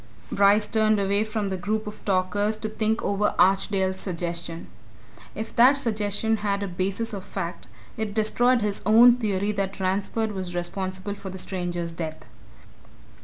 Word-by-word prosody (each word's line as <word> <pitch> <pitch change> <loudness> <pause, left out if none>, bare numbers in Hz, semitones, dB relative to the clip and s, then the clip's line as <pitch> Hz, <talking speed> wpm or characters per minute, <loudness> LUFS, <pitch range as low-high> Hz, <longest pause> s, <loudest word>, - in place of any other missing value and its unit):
Bryce 200 +1 +4
turned 215 -1 +2
away 200 +1 +1
from 215 -2 -2
the 190 - -2
group 215 +4 -2
of 210 0 -9
talkers 205 +2 +1
to 215 0 -4
think 220 +1 -1
over 200 +1 0
Archdale's 190 0 +2
suggestion. 170 -2 -4 0.7
If 220 +1 -6
that 250 +4 +8
suggestion 220 -3 0
had 200 -1 -1
a - - -2
basis 195 +5 -2
of 195 -2 -5
fact, 180 -3 -5 0.3
it 220 -2 -3
destroyed 245 +3 +3
his 210 -1 -1
own 235 +4 +7
theory 205 -3 0
that 195 -1 -3
Ransford 200 +4 -1
was 185 -3 -5
responsible 185 +3 -3
for 200 -1 -8
the 190 - -7
stranger's 175 -2 -3
death. 160 -1 -6
200 Hz, 155 wpm, -25 LUFS, 185-215 Hz, 0.7 s, that